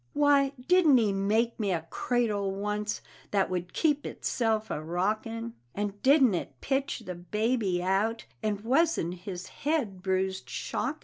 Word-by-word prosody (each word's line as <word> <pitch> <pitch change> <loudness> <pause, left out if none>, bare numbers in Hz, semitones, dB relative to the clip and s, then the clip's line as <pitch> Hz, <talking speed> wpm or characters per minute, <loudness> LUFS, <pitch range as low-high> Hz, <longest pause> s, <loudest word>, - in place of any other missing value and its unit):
Why, 285 -1 +4
didn't 350 -7 +6
he 215 -4 +2
make 220 +5 +1
me 205 -3 0
a 165 -3 -1
cradle 220 -5 0
once 210 +2 -2 0.3
that 195 -2 +1
would 180 -1 -3
keep 295 -3 +1
itself 220 -2 -1
a - - -2
rockin', 215 +8 -2 0.2
And 205 0 -3
didn't 265 -5 +5
it 140 -7 -4
pitch 270 0 -1
the 185 - -4
baby 195 +1 0
out, 200 +5 0 0.2
and 210 -2 -1
wasn't 265 - +2
his 180 0 -7 0.2
head 265 - 0
bruised 190 -7 -1
shockin'? - - -3
210 Hz, 145 wpm, -29 LUFS, 190-245 Hz, 0.3 s, didn't